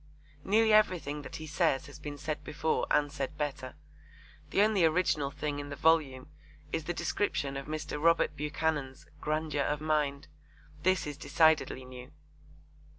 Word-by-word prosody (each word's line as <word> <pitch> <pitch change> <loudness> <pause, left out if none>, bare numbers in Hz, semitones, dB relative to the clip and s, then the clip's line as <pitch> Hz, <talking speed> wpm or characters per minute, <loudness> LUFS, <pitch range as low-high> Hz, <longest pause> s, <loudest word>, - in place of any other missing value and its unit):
Nearly 220 +2 +4
everything 180 -9 +2
that - - -9
he 155 - -6
says 150 -2 +1
has 145 - -12
been 145 -1 -6
said 150 0 -4
before 155 +2 -1
and 145 -1 +2
said 145 +1 -4
better. 140 -3 -4 0.7
The 200 - +4
only 210 -4 +3
original 160 -3 +2
thing 145 +1 -4
in 145 0 -6
the 140 - -5
volume 145 -4 +2 0.5
is 160 -1 -1
the - - -1
description 145 -10 -1
of 135 0 -5
Mr. 155 -1 -4
Robert 165 -2 +3
Buchanan's 150 -2 -2
'grandeur 155 -1 -1
of 150 +1 0
mind.' 150 -2 0 0.5
This 185 +2 +2
is 145 -1 -5
decidedly 145 -3 +2
new. 125 +1 -10
150 Hz, 155 wpm, -31 LUFS, 145-160 Hz, 0.7 s, Nearly